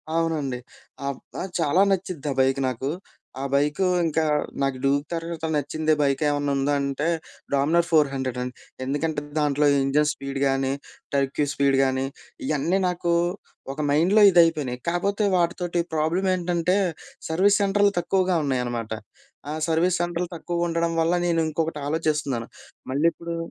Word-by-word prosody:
అవునండి. 155 -6 0 0.5
ఆహ్, 140 -2 -3 0.2
ఆ! - - -2 0.2
చాలా 165 +3 +3
నచ్చుద్ది 180 -6 -2
ఆ - - -1
బైక్ 135 +1 +3
నాకు. 130 +2 -2 0.5
ఆ - - -3
బైక్ 145 +5 +1 0.2
ఇంకా, 160 0 +1 0.4
నాకు 135 -1 0
డ్యూక్ 140 +1 +2
తరవాత 165 -1 -4
నచ్చిందే 155 +2 0
బైక్ 140 0 +1
ఏమన్నా 145 -1 0
ఉందంటే 140 +1 0 0.5
'డామినోర్ 160 +5 +3
ఫోర్ 155 -3 +5
హండ్రెడ్' 130 -2 -3
అండి. 125 0 -4 0.3
ఎందుకంటే 145 +2 -1 0.2
దాంట్లో 150 0 +2 0.2
ఇంజిన్ 145 +2 +2
స్పీడ్ 135 0 -5
గానీ, 135 0 +1 0.4
టర్క్యూ 140 +1 +1
స్పీడ్ 140 -1 +2
గానీ, 130 0 0 0.4
ఇయన్నీ 160 +6 +1
నాకు 175 -1 0 0.6
ఒక 145 - -11
మైండ్‌లో 175 +9 +4
ఇదైపోయినాయి. 160 -8 +3
కాపోతే 200 +5 0
వాటితోటి 175 0 0
ప్రాబ్లమేంటంటే 175 +2 +1 0.5
సర్వీస్ 195 +6 +3
సెంటర్లు 200 0 +3
తక్కువగా 185 0 +1
ఉన్నాయన్నమాట. 120 -4 -2 0.6
ఆ - - -2 0.2
సర్వీస్ 170 +2 +2
సెంటర్లు 175 0 -2
తక్కువగా 170 +1 -2
ఉండడం 165 0 0
వల్ల 165 +2 +2
నేనుంకొకటి 160 -1 0
ఆలోచిస్తున్నాను. 150 -6 -1 0.4
మళ్ళీప్పుడు 170 +4 0
155 Hz, 130 wpm, -24 LUFS, 140-170 Hz, 0.6 s, ఫోర్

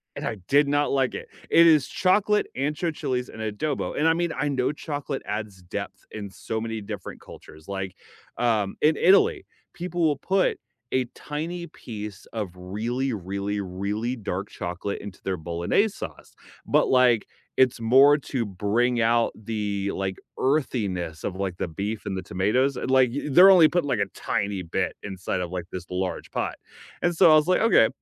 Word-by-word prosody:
and - - -5
I 115 - -2
did 145 +1 +4
not 145 +1 +1
like 135 -2 +1
it. - - -6 0.2
It 170 - +7
is 155 -5 +5
chocolate, 210 +3 +2
ancho 150 +5 -1
chilies 130 -4 -2
and 110 - -9
adobo, 110 +7 -2
and 155 - +3
I 160 - +5
mean, 170 0 -1
I 150 - 0
know 130 -1 +1
chocolate 145 -2 -5
adds 105 -3 -5
depth 90 - -6
in 105 -2 -6
so 110 +3 -4
many 115 0 -3
different 100 - -7
cultures, 75 0 -14
like, 95 -2 -4 0.4
um, 110 -5 +1
in 155 +1 +4
Italy, 385 - +4 0.3
people 175 0 -4
will 150 -3 +3
put 190 +5 +1 0.4
a 130 -1 +2
tiny 165 +4 -5
piece 105 - -8
of 105 -5 -3
really, 115 +8 -2
really, 100 +1 -3
really 100 +6 -3
dark 100 -4 -4
chocolate 90 +3 -4
into 100 -2 -9
their 95 -1 -1
Bolognese 85 - +1
sauce, - - -9 0.3
but, - - +3
like, 125 -4 +4 0.3
it's 130 -2 +4
more 135 +6 +7
to 130 -4 -3
bring 110 +5 +1
out 115 +1 +3
the, 105 -2 -3
like, 95 -1 -3 0.2
earthiness 100 - -1
of, 95 - -3
like, 95 -2 -3
the - - -2
beef 100 +6 -4
and 95 - -3
the 95 - -3
tomatoes, 110 +10 +1
and, - - -2
like, 130 -2 +5 0.2
they're 180 +8 +9
only 175 -4 +8
putting 170 -2 0
like 130 - +1
a 100 - +2
tiny 100 -2 -2
bit 85 - -2
inside 95 -2 -3
of, 90 - -3
like, 90 -2 -4
this 90 -2 -6
large 90 0 -3
pot, - - -2 0.5
and 175 -1 +1
so 165 - +7
I - - +8
was 155 +1 +4
like, 185 - +3
"Okay, 225 +1 +6
115 Hz, 180 wpm, -25 LUFS, 100-145 Hz, 0.5 s, they're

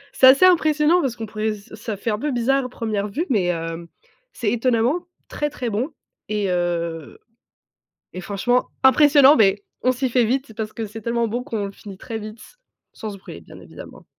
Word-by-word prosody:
C'est 260 - +7
assez 270 +7 +7
impressionnant 320 -1 +4
parce 265 -6 -2
qu'on 225 -2 -6
pourrait 215 0 -2
ce 205 +1 -13
ça 220 -1 -5
fait 220 +3 -2
un 210 - -2
peu 295 +4 -2
bizarre 265 +2 +1
à - - -5
1re 215 -4 -3
vue 305 - -2
mais 190 -8 +2
heu, 165 0 -5 0.4
c'est 215 -4 -2
étonnamment 245 +8 +1 0.2
très 295 - -3
très 250 -5 -4
bon 230 +8 -1 0.4
et 210 -2 -1
heu 170 - -2 0.9
et 185 - -7
franchement 205 +7 0 0.2
impressionnant, 285 +1 +6
beh 200 -1 +3 0.2
on 255 - +2
s'y 260 +1 -1
fait 245 -1 +2
vite 260 +1 -2
parce 215 -1 -5
que 225 - -4
c'est 220 +2 -9
tellement 235 +1 0
bon 240 +3 -2
qu'on 225 -6 -3
le - - -8
finit 195 -1 -11
très 225 +3 -6
vite 215 +1 -9 0.5
sans 215 - -7
se 200 - -9
brûler, 185 - -11
bien - - -14
évidemment. - - -12
225 Hz, 200 wpm, -22 LUFS, 205-260 Hz, 0.9 s, C'est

